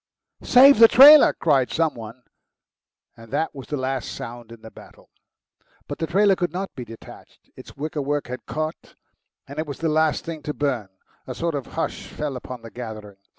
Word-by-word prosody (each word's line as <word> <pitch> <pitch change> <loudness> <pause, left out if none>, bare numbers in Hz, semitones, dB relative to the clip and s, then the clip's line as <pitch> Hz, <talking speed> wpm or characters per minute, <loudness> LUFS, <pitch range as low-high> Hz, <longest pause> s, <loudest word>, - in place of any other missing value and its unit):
"Save 270 +1 +6
the 230 - +10
trailer!" 285 +5 +8
cried 140 -6 +1
some 160 -1 0
one, 115 +2 -11 0.9
and 115 -1 -16
that 160 - -2
was 135 -2 -10
the 150 - -4
last 130 -1 -4
round 120 -1 -9
in 115 -1 -13
the 110 - -11
battle. - - -17 0.8
But - - -7
the 160 - -2
trailer 195 +3 +3
could 175 -3 -2
not 190 +3 -5
be 125 - -7
detached; 115 -1 -15
its - - -14
wicker 150 +1 -4
work 145 +1 -2
had 125 0 -9
caught, 155 +1 -6 0.5
and 140 +2 -8
it 155 - -3
was 140 - -7
the 165 - -2
last 155 0 0
thing 165 -2 -7
to 150 0 -6
burn. 130 -9 -2 0.4
A - - -6
sort 170 -1 -2
of 140 -4 -5
hush - - -4
fell 150 -3 -5
upon 125 -1 -9
the 115 - -11
gathering. 110 -4 -9
145 Hz, 195 wpm, -22 LUFS, 120-160 Hz, 0.9 s, the